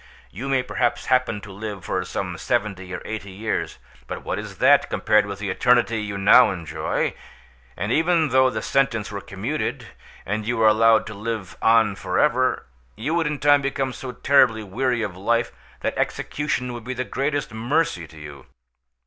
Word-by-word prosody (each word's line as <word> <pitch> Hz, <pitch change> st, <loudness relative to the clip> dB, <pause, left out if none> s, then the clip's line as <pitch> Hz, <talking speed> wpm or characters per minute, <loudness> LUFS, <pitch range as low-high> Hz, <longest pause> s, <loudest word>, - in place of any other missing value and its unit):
You 130 Hz, +8 st, -6 dB
may 135 Hz, -2 st, +2 dB
perhaps 125 Hz, -1 st, -1 dB
happen 125 Hz, -5 st, +1 dB
to 100 Hz, -, -10 dB
live 100 Hz, -1 st, -7 dB
for 95 Hz, -, -1 dB
some 90 Hz, 0 st, -4 dB
seventy 100 Hz, -6 st, -2 dB
or 90 Hz, -, -5 dB
eighty 105 Hz, -2 st, -5 dB
years, 105 Hz, +4 st, -3 dB, 0.3 s
but -, -, -6 dB
what -, -, -3 dB
is -, -, -8 dB
that, -, -, +4 dB
compared 105 Hz, -1 st, +2 dB
with 100 Hz, -1 st, -5 dB
the 100 Hz, -2 st, -3 dB
eternity 120 Hz, 0 st, +2 dB
you 100 Hz, -1 st, -4 dB
now 105 Hz, +5 st, +7 dB
enjoy? 85 Hz, -5 st, -2 dB, 0.6 s
And 105 Hz, -, -2 dB
even 160 Hz, +1 st, +2 dB
though 130 Hz, 0 st, +4 dB
the 110 Hz, -3 st, -4 dB
sentence 120 Hz, -7 st, 0 dB
were 100 Hz, -1 st, -5 dB
commuted, 105 Hz, +10 st, -4 dB, 0.4 s
and 105 Hz, +3 st, -2 dB
you 120 Hz, +2 st, -2 dB
were 110 Hz, -, +3 dB
allowed 110 Hz, +1 st, +5 dB
to 110 Hz, -, -7 dB
live 105 Hz, -2 st, -5 dB
on 110 Hz, -3 st, +4 dB
for -, -, -3 dB
ever, -, -, +2 dB, 0.3 s
you 145 Hz, -, -3 dB
would 170 Hz, -2 st, +1 dB
in 150 Hz, 0 st, -2 dB
time 145 Hz, 0 st, +4 dB
become 135 Hz, -1 st, -2 dB
so 130 Hz, 0 st, -6 dB
terribly 125 Hz, -5 st, +3 dB
weary 120 Hz, +4 st, -1 dB
of 100 Hz, -4 st, -4 dB
life 115 Hz, +5 st, 0 dB, 0.3 s
that -, -, -2 dB
execution 135 Hz, -4 st, -2 dB
would 120 Hz, -1 st, -7 dB
be 130 Hz, +2 st, -5 dB
the 130 Hz, -, -2 dB
greatest 140 Hz, -1 st, -2 dB
mercy 115 Hz, -, 0 dB
to 80 Hz, -, -16 dB
you. 75 Hz, -3 st, -11 dB
115 Hz, 185 wpm, -23 LUFS, 100-130 Hz, 0.6 s, now